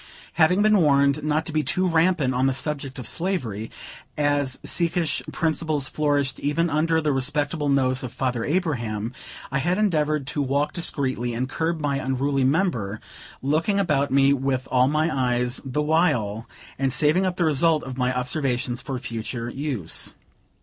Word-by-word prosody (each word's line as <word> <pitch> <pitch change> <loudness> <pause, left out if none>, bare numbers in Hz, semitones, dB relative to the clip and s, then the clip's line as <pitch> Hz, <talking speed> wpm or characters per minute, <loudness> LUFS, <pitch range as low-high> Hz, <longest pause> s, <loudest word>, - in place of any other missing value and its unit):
Having 180 +5 +4
been 215 -1 +5
warned 140 -2 +3
not 155 +1 0
to - - -5
be 155 0 +1
too 185 +6 0
rampant 165 -5 +2
on 130 +2 +2
the 135 - +1
subject 140 -1 -3
of 125 - -6
slavery, 125 - -2 0.5
as 145 -3 +1
secesh 170 -2 0
principles 155 -3 0
flourished 145 -3 0
even 165 +3 0
under 160 +2 +2
the 150 -2 +1
respectable 145 +3 0
nose 130 -2 +2
of 125 - -5
Father 125 -3 -2
Abraham, 120 - -1 0.4
I 135 - 0
had 175 +6 0
endeavored 155 -8 +1
to 145 +2 -2
walk 140 +2 0
discreetly, 130 -8 -1
and 125 +2 -1
curb 160 +4 -2
my 140 -2 0
unruly 135 +1 0
member; 130 - 0 0.4
looking 160 +8 +1
about 145 -8 +1
me 135 +1 +4
with 135 -1 -1
all 125 0 +4
my 155 +3 +1 0.2
eyes, 125 +1 -1
the 135 +3 -2
while, 145 - +1 0.3
and 135 -1 +1
saving 155 +8 +2
up 180 -1 -3
the 175 - +2
result 155 +1 +2
of 130 0 -7
my 125 0 +2
observations 125 -1 -1
for 135 -3 -4
future 115 0 -5
use. 130 - -2
140 Hz, 165 wpm, -24 LUFS, 130-160 Hz, 0.5 s, been